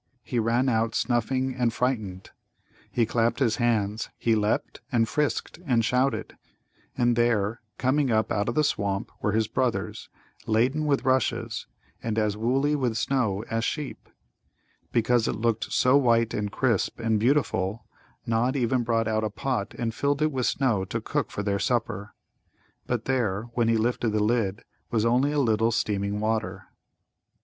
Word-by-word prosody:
He 120 - -2
ran 115 +3 +2
out 115 -2 +1
snuffing 130 +2 0
and 125 -2 +1
frightened. 110 -7 -2 0.6
He 120 - +1
clapped 115 0 +1
his 120 -6 +1
hands; 110 -3 0
he 115 - +1
leapt 105 -1 0
and 115 -2 +2
frisked 150 +4 -1
and 120 -8 +2
shouted. 125 -2 0 0.6
And 120 -1 +3
there, 115 -2 +1 0.2
coming 135 +2 +1
up 110 -1 +1
out 105 +2 0
of 120 - -3
the 155 - +3
swamp, 100 -8 -1
were 105 - 0
his 110 0 +2
brothers, 130 -1 -2 0.4
laden 130 +8 +2
with 140 -3 +1
rushes, 130 -1 0 0.3
and 115 -1 -2
as 105 -2 +1
woolly 135 +7 +1
with 125 -6 0
snow 110 -7 0
as 115 0 0
sheep. 150 +2 -4 0.8
Because 120 0 +2
it - - -1
looked 115 0 -1
so 125 +2 +4
white 115 -4 +3
and 105 -1 -2
crisp 115 -3 0
and 110 -2 +1
beautiful 115 -5 +1 0.4
Nod 115 +4 +1
even 125 -1 +1
brought 115 -1 0
out 110 0 0
a 110 - 0
pot 120 0 -3
and 115 -2 -2
filled 145 +4 0
it 155 - +2
with 130 -3 0
snow 120 -8 +1
to - - -3
cook - - -2
for 105 - -4
their 100 -1 0
supper. 115 -4 -1 0.7
But 120 -3 -1
there, 120 -4 -1
when 120 -1 +1
he 115 0 +3
lifted 115 0 0
the 105 -1 +2
lid, 110 -2 0 0.3
was 115 -2 +1
only 125 +5 +3
a 150 - -1
little 115 -4 +2
steaming 100 -2 -1
water. 110 0 -1
115 Hz, 165 wpm, -26 LUFS, 110-125 Hz, 0.8 s, so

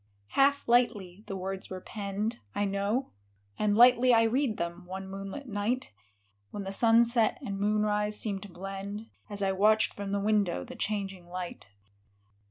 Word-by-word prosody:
" 100 0 -39
Half 280 +1 +3
lightly 210 -6 +1
the 195 - -4
words 190 +1 -5
were 185 - -5
penned, 205 +3 -4 0.2
I 205 - +1
know, 200 +6 -1 0.5
And 210 -1 +2
lightly 250 +1 +7
I 225 - +5
read 235 0 +1
them, 170 +1 -4
one 190 +1 -6
moonlit 195 +8 -7
night, 215 - -2 0.6
When 205 - -6
the 195 - -5
sunset 230 +2 +4
and 200 -1 -4
moonrise 210 0 +1
seemed 200 -3 -2
to 205 - -9
blend. 195 +4 -7 0.2
As 205 -1 -2
I 195 - +2
watched 215 +3 +3
from 200 -1 -5
the 200 - 0
window 200 - +1
the - - -10
changing 195 -4 -3
light. 180 - -6
205 Hz, 165 wpm, -29 LUFS, 195-225 Hz, 0.6 s, lightly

